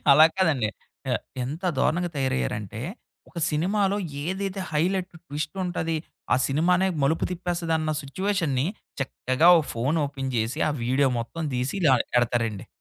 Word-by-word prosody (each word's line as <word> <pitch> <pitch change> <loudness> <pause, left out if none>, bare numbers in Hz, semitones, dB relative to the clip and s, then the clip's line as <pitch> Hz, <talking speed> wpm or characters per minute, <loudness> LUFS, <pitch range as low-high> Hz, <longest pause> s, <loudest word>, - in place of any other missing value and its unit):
అలా 155 +3 +9
కాదండి. 145 - +2 0.4
ఎ - - +1 0.3
ఎంత 150 +8 -5 0.2
దారుణంగా 175 +1 +1
తయారయ్యారంటే, 115 -6 -1 0.5
ఒక 175 - -8
సినిమాలో 195 +6 +1 0.3
ఏదైతే 190 +2 -2
హైలైట్ 180 +4 0
ట్విస్ట్ 150 +4 -4
ఉంటది, 165 -2 -1 0.4
ఆ - - +6
సినిమానే 180 +7 +3
మలుపు 160 +4 +2
తిప్పేస్తదన్న 170 -3 -1
సిచ్యువేషన్‌ని, 160 -3 0 0.3
చక్కగా 135 +4 +2
ఒక 160 - 0
ఫోన్ 135 +8 +1
ఓపెన్ 135 -2 -4
జేసి 115 +2 -1
ఆ - - +1
వీడియో 130 +3 +3
మొత్తం 160 +8 -5
తీసి 125 +5 -1
ఇలా 140 -6 +5 0.2
ఎడతారండి. 115 -4 0
155 Hz, 130 wpm, -26 LUFS, 130-180 Hz, 0.5 s, అలా